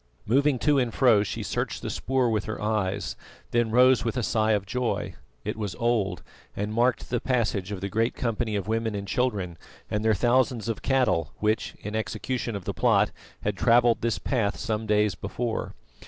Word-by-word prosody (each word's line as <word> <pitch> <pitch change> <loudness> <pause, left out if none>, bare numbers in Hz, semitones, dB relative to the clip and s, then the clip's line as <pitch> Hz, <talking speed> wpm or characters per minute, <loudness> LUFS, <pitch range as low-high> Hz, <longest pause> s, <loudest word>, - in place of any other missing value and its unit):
Moving 140 +4 +3
to 145 +2 +3
and 125 -3 0
fro 120 -6 +4
she 105 - -3
searched - - -3
the - - -3
spoor 130 -2 0
with 105 -1 0
her 110 -2 -4
eyes, 100 -3 -1 0.4
then 120 -1 +2
rose 125 +2 +5
with 115 +2 -2
a 125 - 0
sigh 110 0 +2
of 100 -2 0
joy. 120 +4 -2 0.3
It - - -2
was 105 -4 -3
old, 115 -5 0 0.3
and 105 +2 -3
marked 120 +3 +1
the 120 - +1
passage 110 -6 0
of 100 -3 -4
the 100 - -2
great 115 +4 0
company 115 -2 -1
of 100 -2 -2
women 110 -1 -1
and 100 0 -4
children 100 -9 -1 0.3
and 105 +1 0
their 110 -1 +3
thousands 120 +1 +2
of 115 -2 -2
cattle 110 - +1
which, 110 +1 0
in 105 +1 -5
execution 110 +2 -2
of 100 - -6
the - - -2
plot, - - +3 0.3
had 105 -1 -1
travelled 120 +2 +4
this 115 -1 0
path 110 -6 -1
some 110 -1 -2
days 105 -1 +3
before. 110 +5 -4
110 Hz, 190 wpm, -26 LUFS, 105-120 Hz, 0.4 s, rose